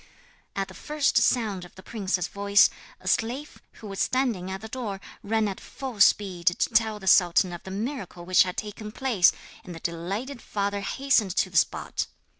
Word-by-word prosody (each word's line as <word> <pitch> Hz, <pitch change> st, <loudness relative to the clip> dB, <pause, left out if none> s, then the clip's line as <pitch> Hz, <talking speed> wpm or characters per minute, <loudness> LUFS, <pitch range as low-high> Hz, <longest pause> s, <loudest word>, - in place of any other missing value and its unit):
At 195 Hz, -1 st, -1 dB
the -, -, -12 dB
first 300 Hz, -2 st, 0 dB
sound 215 Hz, -7 st, +2 dB
of 175 Hz, -, -14 dB
the 190 Hz, -, -13 dB
princess's 195 Hz, -5 st, -2 dB
voice, 200 Hz, 0 st, +4 dB, 0.3 s
a -, -, -12 dB
slave, 255 Hz, +6 st, -1 dB
who 215 Hz, -, -11 dB
was 195 Hz, -1 st, -6 dB
standing 235 Hz, -9 st, 0 dB
at 190 Hz, 0 st, -5 dB
the 220 Hz, -, -7 dB
door, 220 Hz, -5 st, -5 dB, 0.2 s
ran 220 Hz, +1 st, +1 dB
at 195 Hz, -, -4 dB
full 260 Hz, -6 st, -8 dB
speed 190 Hz, -3 st, +3 dB
to 175 Hz, -, +5 dB
tell 220 Hz, -1 st, +2 dB
the 195 Hz, -, -10 dB
sultan 180 Hz, -1 st, +4 dB
of 175 Hz, -, -7 dB
the -, -, -10 dB
miracle 200 Hz, -4 st, -5 dB
which 185 Hz, +1 st, +5 dB
had 180 Hz, -1 st, +1 dB
taken 210 Hz, 0 st, -6 dB
place, 220 Hz, -7 st, +3 dB, 0.3 s
and 175 Hz, -, -9 dB
the -, -, -8 dB
delighted 195 Hz, +12 st, -4 dB
father 200 Hz, 0 st, -2 dB
hastened 215 Hz, -2 st, +1 dB
to -, -, +1 dB
the -, -, -13 dB
spot. -, -, 0 dB
200 Hz, 190 wpm, -26 LUFS, 185-230 Hz, 0.3 s, to